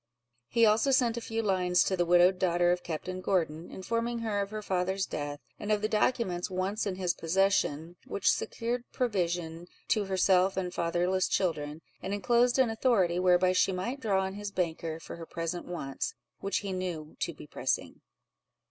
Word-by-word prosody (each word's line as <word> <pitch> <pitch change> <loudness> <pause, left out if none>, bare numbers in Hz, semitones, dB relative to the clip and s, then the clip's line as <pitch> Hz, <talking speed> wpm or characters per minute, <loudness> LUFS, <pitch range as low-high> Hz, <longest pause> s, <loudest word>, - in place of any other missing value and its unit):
He 230 - +4
also 220 +5 +4
sent 250 -3 +3
a 235 - -4
few 225 0 -2
lines 180 -3 +3
to 190 - 0
the 175 -1 0
widowed 180 +1 +5
daughter 175 -1 +3
of 180 0 0
Captain 185 +3 -5
Gordon, 165 -4 -1
informing 230 +4 -2
her 220 -3 -1
of 200 - -3
her 215 0 -5
father's 190 0 0
death, 145 -1 -4 0.2
and 210 - -3
of 210 0 +1
the - - +3
documents 210 -4 0
once 190 +4 -1
in 190 - -2
his 180 -2 0
possession, 175 -2 +1
which 200 - +2
secured 240 +1 -2
provision 175 -7 -1 0.2
to 215 -2 +2
herself 190 0 +3
and 180 -2 -2
fatherless 175 +2 +1
children; 155 -4 -1 0.2
and 195 +2 -2
enclosed 240 +4 +3
an 255 -4 +3
authority, 210 -7 +2
whereby 180 0 +4
she 185 +1 +3
might 230 +9 -3
draw 200 -6 +1
on 190 0 -3
his 205 0 -5
banker 165 -4 -2
for 165 - -9
her 165 - -8
present 165 +1 -4
wants, 140 -6 -4 0.2
which 195 - -1
he 200 -2 -4
knew 175 -5 -4
to - - -1
be - - -12
pressing. - - -2
185 Hz, 180 wpm, -30 LUFS, 175-210 Hz, 0.2 s, widowed